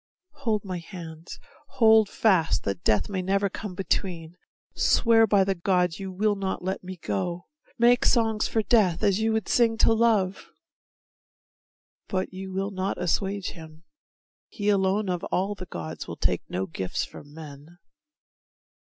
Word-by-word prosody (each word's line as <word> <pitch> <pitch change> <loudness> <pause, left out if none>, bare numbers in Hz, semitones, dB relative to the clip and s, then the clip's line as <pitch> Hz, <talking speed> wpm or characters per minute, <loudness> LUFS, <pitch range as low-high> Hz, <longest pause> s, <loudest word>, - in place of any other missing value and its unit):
Hold 225 -8 -2
my 185 -2 -4
hands, 165 -2 -9 0.4
Hold 220 -3 +6
fast 185 -7 +2
that 100 -3 -3
Death 105 -2 +2
may 190 -2 -3
never 195 +2 +1
come 200 -3 -6
between; 175 -3 -2 0.4
Swear 225 -1 +4
by 200 -2 +4
the 195 0 0
gods 180 -1 0
you 190 -1 -5
will 205 +3 +1
not 190 -2 -3
let 190 +1 -3
me 185 0 -7
go; 170 - -3 0.3
Make 240 +1 +4
songs 225 -3 +2
for 220 - 0
Death 195 -7 +2
as 200 0 +3
you 220 0 +1
would 220 -1 -1
sing 230 -2 +3
to 225 - +4
Love 220 -5 +1 1.6
But 185 0 -2
you 190 0 -7
will 195 +2 -2
not 190 0 -2
assuage 195 +2 -1
him. 160 -1 -13 0.7
He 205 -2 -2
alone 200 +1 +2
Of 180 -2 -2
all 195 +3 -1
the 185 -3 -9
gods 80 - -7
will - - -7
take - - 0
no 95 +1 -2
gifts 95 +1 -3
from 145 +1 -13
men. 155 +1 -11
190 Hz, 155 wpm, -26 LUFS, 170-210 Hz, 1.6 s, Hold